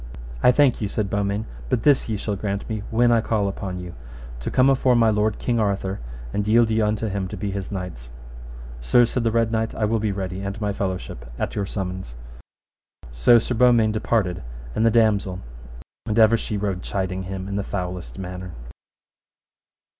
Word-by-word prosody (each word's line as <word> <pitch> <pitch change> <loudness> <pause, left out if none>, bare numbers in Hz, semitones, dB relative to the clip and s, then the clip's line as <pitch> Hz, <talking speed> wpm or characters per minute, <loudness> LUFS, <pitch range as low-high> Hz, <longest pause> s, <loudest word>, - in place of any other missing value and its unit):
I 125 - +7
thank 135 -2 +3
you, 105 - 0
said 100 0 -2
Beaumains, 100 +1 -1 0.2
but 115 - 0
this 145 -5 +4
ye 110 - -1
shall 105 +1 -2
grant 100 0 -3
me: 110 -1 -3
when 120 +1 +3
I 115 -1 +4
call 110 -2 0
upon 95 -1 -4
you, 90 -1 -7 0.5
to - - -4
come 130 +1 +4
afore 130 -2 +4
my 115 -2 +4
lord 105 0 +1
King 120 -2 0
Arthur, 100 -2 -1 0.3
and 105 0 -1
yield 115 +1 +4
you 110 0 +2
unto 105 +1 0
him 100 -2 -2
to 105 +3 -7
be 100 +1 -3
his 100 0 -5
knights. 90 -11 -6 0.7
Sir, 120 - +4
said 120 +1 -2
the 115 - +2
Red 115 0 +1
Knight, 110 0 -1
I 110 - 0
will 110 +1 +1
be 105 -1 0
ready, 95 -1 -4
and 100 +2 -4
my 105 -2 -1
fellowship, 90 -12 -4
at - - -2
your 100 -2 -2
summons. 95 - -5 1.0
So - - +5
Sir 115 +2 0
Beaumains 115 -2 +4
departed 105 -5 0 0.3
and 110 - 0
the 115 - +5
damosel, 105 -5 +2 0.7
and 110 - -1
ever 110 0 +6
she 110 -2 -3
rode 100 -3 -2
chiding 95 -1 -2
him 95 0 -5
in 100 - -4
the 100 - -1
foulest 90 -11 -5
manner. 90 -1 -6
105 Hz, 190 wpm, -23 LUFS, 95-110 Hz, 1.0 s, I